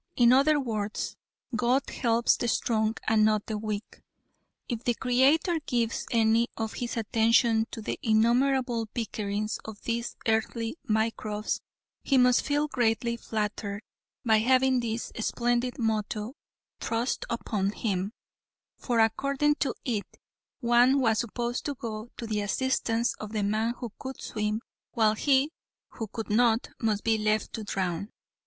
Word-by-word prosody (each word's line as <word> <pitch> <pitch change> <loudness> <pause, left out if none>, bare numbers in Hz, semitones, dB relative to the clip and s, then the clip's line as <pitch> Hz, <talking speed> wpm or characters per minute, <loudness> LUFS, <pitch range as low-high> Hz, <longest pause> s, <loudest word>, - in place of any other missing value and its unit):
In 240 0 +6
other 290 +3 +5
words, 215 -5 -3 0.4
God 250 +3 +2
helps 235 -1 +2
the 240 - -2
strong 220 -1 +1
and 220 0 +4
not 215 -1 +2
the 220 - -3
weak. 215 0 -5 0.7
If 240 -2 -4
the 240 - +1
Creator 275 +8 +3
gives 235 -3 -1
any 230 0 +3
of 220 -1 -3
His 240 -1 -4
attention 225 +1 +3
to 225 - -7
the - - -3
innumerable 240 +1 +2
bickerings 215 -2 -2
of 220 -2 -8
these 235 0 -2
earthly 225 +2 0
microbes 220 -1 -1 0.4
He 275 - +2
must 250 -1 +5
feel 290 +1 +1
greatly 235 -3 +1
flattered 210 -2 -3 0.4
by 220 -2 +5
having 260 +2 +3
this 230 -1 -3
splendid 240 +2 0
motto 220 -1 -1 0.5
thrust 230 +2 -1
upon 210 -4 -1
Him, 200 -2 -2 0.7
for 240 -3 0
according 275 +6 +2
to 275 - 0
it, 220 -5 -1 0.5
one 245 +3 +5
was 225 -4 +2
supposed 240 +1 -2
to 285 - -2
go 225 -2 -6
to 235 - -5
the 215 -2 -1
assistance 235 +1 0
of 215 0 -7
the 210 -2 0
man 220 +4 0
who 240 -3 -6
could 265 0 -7
swim, 215 0 -2 0.3
while 220 -2 +3
he 275 +5 +2 0.4
who 225 - -6
could 220 +1 -6
not, 230 +1 +3
must 215 -4 0
be 225 -1 +2
left 215 0 0
to 220 - -4
drown. 190 -1 -2
230 Hz, 145 wpm, -28 LUFS, 215-245 Hz, 0.7 s, In